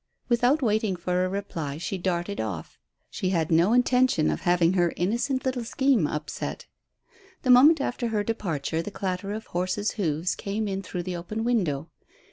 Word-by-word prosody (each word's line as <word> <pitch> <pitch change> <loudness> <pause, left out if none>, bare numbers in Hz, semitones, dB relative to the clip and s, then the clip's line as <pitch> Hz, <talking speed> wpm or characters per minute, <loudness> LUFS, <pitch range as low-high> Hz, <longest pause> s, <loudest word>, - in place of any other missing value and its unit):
Without 245 +5 +3
waiting 215 -3 +1
for 180 +1 -1
a 185 - 0
reply 165 -7 -4
she 180 +3 -4
darted 180 +2 -2
off. 95 -8 -6 0.3
She 185 - -2
had 165 -4 0
no 170 +5 +4
intention 250 -7 +3
of - - -3
having 175 -1 +3
her 175 -2 +2
innocent 240 +9 0
little 255 -2 -1
scheme 255 - +2
upset. 150 +1 -5 0.8
The 255 - +4
moment 290 +6 +7
after 245 -3 -2
her 215 -2 0
departure 165 -8 -2
the 185 - -5
clatter 195 0 -3
of 220 +1 -5
horse's 185 +4 -1
hoofs 170 -3 -1
came 210 +2 -3
in 195 -1 -2
through 180 -2 -5
the 180 0 -4
open 215 +6 -4
window. 190 - 0
195 Hz, 170 wpm, -26 LUFS, 170-230 Hz, 0.8 s, moment